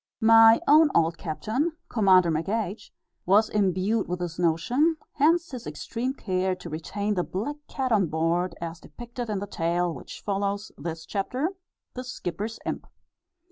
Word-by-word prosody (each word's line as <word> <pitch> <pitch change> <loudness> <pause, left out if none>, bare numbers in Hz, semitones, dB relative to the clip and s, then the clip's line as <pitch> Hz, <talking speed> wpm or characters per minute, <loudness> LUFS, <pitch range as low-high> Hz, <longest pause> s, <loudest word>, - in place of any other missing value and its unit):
My 225 0 +7
own 305 +1 +7
old 165 0 +2
captain, 215 - -2
Commander 185 -6 +4
McH 200 +6 -2 0.4
was 210 +3 +5
imbued 200 +2 +1
with 180 - -2
this 175 -1 -5
notion, 240 - +2 0.2
hence 330 +4 +2
his 250 -3 -7
extreme 255 +3 -4
care 185 -4 -1
to 180 -2 -10
retain 200 +6 -2
the 180 -3 0
black 250 +14 -4
cat 265 -3 -2
on 200 -5 +3
board, 170 +3 0
as 170 0 -6
depicted 240 +2 -8
in 210 - -1
the 200 - -3
tale, 175 -2 -1
which - - -10
follows 200 0 -2
this 160 +2 -6
Chapter 250 - -2 0.4
"The 255 - -5
Skipper's 215 -2 -5
Imp." - - -4
200 Hz, 150 wpm, -26 LUFS, 175-235 Hz, 0.4 s, My